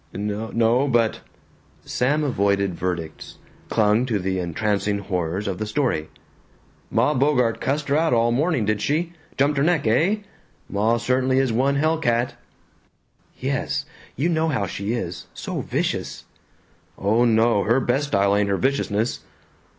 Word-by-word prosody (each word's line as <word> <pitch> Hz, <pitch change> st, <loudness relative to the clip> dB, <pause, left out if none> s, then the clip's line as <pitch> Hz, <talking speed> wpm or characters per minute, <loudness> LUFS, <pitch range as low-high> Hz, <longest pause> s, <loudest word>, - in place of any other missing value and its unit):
"N 100 Hz, -, -3 dB, 0.3 s
no, 120 Hz, +4 st, +3 dB
but 120 Hz, -4 st, +1 dB, 0.3 s
" -, -, -33 dB
Sam 145 Hz, +5 st, +1 dB
avoided 100 Hz, -7 st, +1 dB
verdicts, 85 Hz, -3 st, -5 dB, 0.3 s
clung 110 Hz, +3 st, +2 dB
to 115 Hz, -4 st, 0 dB
the 95 Hz, 0 st, -2 dB
entrancing 100 Hz, +3 st, -1 dB
horrors 95 Hz, 0 st, -2 dB
of 95 Hz, -2 st, -3 dB
the 110 Hz, -, -3 dB
story. 115 Hz, -, -1 dB, 0.8 s
"Ma -, -, +2 dB
Bogart 125 Hz, -4 st, +2 dB
cussed 140 Hz, +2 st, -1 dB
her 140 Hz, -, +3 dB
out 160 Hz, 0 st, +2 dB
all 115 Hz, 0 st, +3 dB
morning, 140 Hz, -2 st, +1 dB
did 105 Hz, 0 st, 0 dB
she? 165 Hz, +4 st, 0 dB, 0.2 s
Jumped 140 Hz, +1 st, +2 dB
her -, -, +2 dB
neck, 165 Hz, -4 st, +2 dB
eh? 175 Hz, -, +2 dB, 0.5 s
Ma 110 Hz, +4 st, +1 dB
certainly 130 Hz, +2 st, +1 dB
is 135 Hz, -3 st, +2 dB
one 135 Hz, +4 st, +2 dB
hell 155 Hz, +3 st, +1 dB
cat." 120 Hz, -5 st, +1 dB, 1.0 s
"Yes, -, -, -2 dB, 0.3 s
you 145 Hz, +7 st, 0 dB
know 160 Hz, -2 st, +1 dB
how 130 Hz, -10 st, 0 dB
she 100 Hz, +3 st, -3 dB
is; 90 Hz, -8 st, -4 dB
so -, -, -4 dB
vicious." -, -, -3 dB, 0.7 s
"Oh 110 Hz, +5 st, +2 dB
no, 115 Hz, -2 st, +3 dB
her 115 Hz, +4 st, +3 dB
best 135 Hz, +3 st, 0 dB
style 100 Hz, -4 st, +2 dB
ain't 100 Hz, -1 st, +1 dB
her 100 Hz, -, +1 dB
viciousness. 120 Hz, -4 st, 0 dB
115 Hz, 150 wpm, -23 LUFS, 100-140 Hz, 1.0 s, no